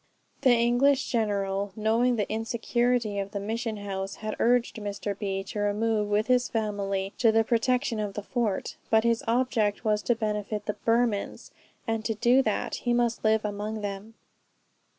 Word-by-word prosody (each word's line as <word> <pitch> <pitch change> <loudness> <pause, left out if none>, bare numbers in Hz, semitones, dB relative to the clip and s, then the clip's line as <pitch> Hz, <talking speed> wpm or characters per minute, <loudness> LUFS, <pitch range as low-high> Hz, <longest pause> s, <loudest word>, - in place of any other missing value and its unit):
The 255 -3 +5
English 245 +4 +3
general, 200 -3 -1
knowing 230 +3 +2
the 210 -3 -1
insecurity 230 0 0
of 200 +1 -4
the 200 - -2
mission 220 +2 -3
house, 195 -1 -4
had 215 0 -5
urged 240 0 +2
Mr. 205 -1 -4
B. 195 -1 -3
to 200 +2 -6
remove 210 +1 +1
with 210 +1 +2
his 250 0 +2
family 200 -3 -2
to 230 -3 +5
the 225 0 +3
protection 235 0 +1
of 205 -2 -3
the 210 - -4
fort; 225 -4 -2
but 220 0 +4
his 230 -1 +1
object 230 -3 +1
was 210 -1 +2
to 240 - +1
benefit 210 -1 -3
the 210 - -1
Burmans, 230 -3 0 0.3
and 225 -1 -1
to 225 0 -1
do 240 +5 +4
that, - - -1
he 240 - -1
must 240 -1 0
live 220 0 +2
among 210 +1 -3
them. 205 +2 -6
220 Hz, 170 wpm, -27 LUFS, 205-235 Hz, 0.3 s, The